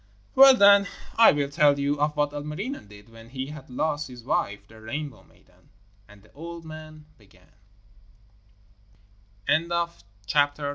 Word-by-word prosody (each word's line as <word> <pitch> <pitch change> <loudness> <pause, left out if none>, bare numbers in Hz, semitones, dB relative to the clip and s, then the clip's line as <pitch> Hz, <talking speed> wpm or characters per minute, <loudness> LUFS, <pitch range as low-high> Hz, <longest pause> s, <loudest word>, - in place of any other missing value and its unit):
'Well, 270 0 +8
then, 200 -2 +6 0.3
I 230 - +7
will 145 -1 -2
tell 145 0 +3
you 145 +1 -1
of 150 0 0
what 145 -1 +1
Ilmarinen 150 - -6
did 105 +1 -16
when 115 0 -15
he 130 0 -5
had 155 -4 -12
lost 150 +3 -2
his 125 -2 -12
wife, 100 -6 -2
the 110 +1 -16
Rainbow 145 +6 -6
maiden,' - - -27 0.4
and 105 -1 -18
the 105 - -24
old 170 +2 -9
man 155 -1 -11
began. 95 -3 -24
145 Hz, 135 wpm, -25 LUFS, 115-155 Hz, 0.4 s, Well